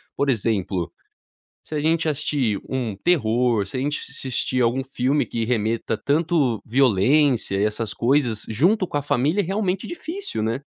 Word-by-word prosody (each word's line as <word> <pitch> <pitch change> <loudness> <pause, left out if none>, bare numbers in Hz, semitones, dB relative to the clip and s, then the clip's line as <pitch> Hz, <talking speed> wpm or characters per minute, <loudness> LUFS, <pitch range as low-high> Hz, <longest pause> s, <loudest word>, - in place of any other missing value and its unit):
por 140 - 0
exemplo, 100 -7 0 0.8
se - - -7
a 150 - 0
gente 160 +1 +1
assistir 135 -7 0
um 120 -6 -2
terror, 120 - +1
se 100 - -6
a - - -1
gente 145 +2 -1
assistir 130 -1 -2
algum 120 +3 +1
filme 135 +2 0
que 115 -1 -2
remeta 115 -1 -1
tanto 145 -6 +1
violência 125 0 +3
e 100 - +2
essas 105 0 -2
coisas 120 -3 +1
junto 180 - +2
com 145 - -5
a - - -3
família 145 +7 +1
é - - -4
realmente 195 0 -1
difícil, 345 - -5
né. 115 +4 -1
130 Hz, 160 wpm, -23 LUFS, 110-150 Hz, 0.8 s, violência